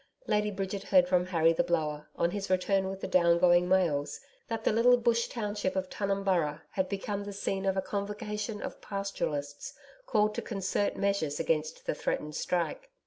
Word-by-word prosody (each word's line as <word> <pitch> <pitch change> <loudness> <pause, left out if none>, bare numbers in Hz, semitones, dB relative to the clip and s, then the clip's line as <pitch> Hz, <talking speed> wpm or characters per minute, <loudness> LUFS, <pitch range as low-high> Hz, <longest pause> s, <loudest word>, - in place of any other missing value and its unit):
Lady 210 0 +1
Bridget 195 0 -3
heard 185 -2 +5
from 180 0 +2
Harry 165 -2 +3
the - - +2
Blower 155 -3 -1
on 170 - +1
his 200 0 -4
return 190 +1 +2
round - - -2
with 195 0 -6
the - - -3
down 170 -1 +4
going 175 0 +4
mails 170 -7 +1 0.3
that 225 -1 -3
the - - +3
little 240 +3 +5
bush 235 -1 +2
township 205 -4 -2
of 185 -1 -2
Tunumburra 190 -6 0
had 190 -2 -1
become 200 0 -3
the 205 - -6
scene 195 -1 -2
of 190 0 +1
a 190 - +1
convocation 210 +1 -4
of - - -7
Pastoralists 150 -8 -4 0.3
called 210 - +2
to - - -3
concert 200 -1 -1
measures 195 -8 0
against 155 -1 -1
the - - 0
threatened 150 0 -3
strike. 340 - -2
195 Hz, 185 wpm, -30 LUFS, 170-205 Hz, 0.3 s, heard